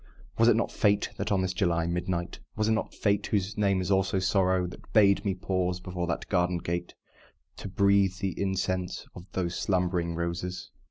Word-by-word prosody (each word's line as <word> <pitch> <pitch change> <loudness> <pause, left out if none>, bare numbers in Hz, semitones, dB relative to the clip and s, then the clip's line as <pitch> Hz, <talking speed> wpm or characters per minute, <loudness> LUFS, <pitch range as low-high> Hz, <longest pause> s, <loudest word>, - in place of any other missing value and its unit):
Was 115 - +6
it 120 - +6
not 115 - 0
Fate, 105 -1 +2
that, - - -2
on 95 -2 +2
this 90 -1 -1
July 85 -3 +1
midnight 85 0 -2 0.2
Was 110 - 0
it - - +3
not 110 - 0
Fate, 100 0 +1
(whose 100 0 -1
name 100 -3 +2
is 90 - -2
also 95 0 +2
Sorrow,) 95 -1 +2
That 90 - -10
bade 100 -2 +5
me 100 -3 0
pause 90 -1 -1
before 90 -1 -4
that 80 - -3
garden 90 -2 +1
gate, 85 +1 -4 0.6
To - - -6
breathe 100 0 +3
the 95 -1 -2
incense 95 -2 -2
of 90 +1 -11
those 90 -2 -1
slumbering 90 -3 0
roses? 85 +2 -4
95 Hz, 185 wpm, -28 LUFS, 90-100 Hz, 0.6 s, Was